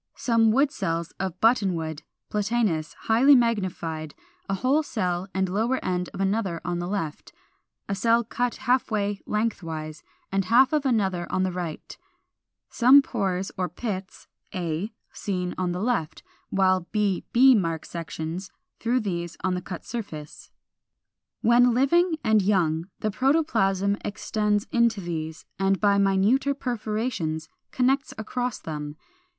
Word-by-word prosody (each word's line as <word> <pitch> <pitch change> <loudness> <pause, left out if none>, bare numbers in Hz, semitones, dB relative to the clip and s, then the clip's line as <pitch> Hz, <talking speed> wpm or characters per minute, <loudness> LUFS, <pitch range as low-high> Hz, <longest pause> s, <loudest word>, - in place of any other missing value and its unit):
Some 230 -2 +3
wood 275 +5 +3
cells 170 - -3
from 190 -2 -2
Buttonwood, 180 -10 +1 0.3
Platanus, 210 -7 0
highly 255 +6 +5
magnified, 185 - -1 0.3
a 195 - +1
whole 265 +10 +2
cell 185 - -2
and 190 0 0
lower 225 +8 0
end 180 -1 -1
of - - -9
another 195 -3 0
on 175 0 -1
the 175 - -3
left; 170 -6 -4 0.6
a 200 - -1
cell 230 +4 +3
cut 245 +2 -2
half 255 0 +1
away 205 -2 -1
lengthwise, 165 -8 -3 0.3
and 195 -1 +1
half 250 +8 +5
of 295 -2 +2
another 190 -8 0
on 185 - +1
the 185 - 0
right; 175 -3 -6 0.7
some 260 +4 +6
pores 195 -6 -2
or 180 - 0
pits 190 +1 -6 0.3
(a) 175 +3 -2 0.2
seen 180 -3 -3
on 180 -1 0
the 180 - -3
left; 215 -8 -1 0.3
while 185 -2 +2
b 210 -3 0
b 260 +2 +7
mark 165 -7 0
sections 165 +2 -5 0.3
through 245 +2 +1
these 175 -4 -4
on 185 - +1
the 180 - -2
cut 180 -1 -7
surface. 160 -11 -7 0.9
When 240 +1 +5
living 330 +6 +3
and 220 -1 +4
young 175 -4 +1
the 215 - 0
protoplasm 205 - +2
extends 210 0 -1
into 235 -3 +3
these 160 -3 -5
and 195 -1 +2
by 200 -1 +3
minuter 200 +9 +3
perforations 215 - -3 0.2
connects 265 +2 +1
across 245 +2 -3
them. 150 -2 -6
195 Hz, 140 wpm, -25 LUFS, 175-235 Hz, 0.9 s, b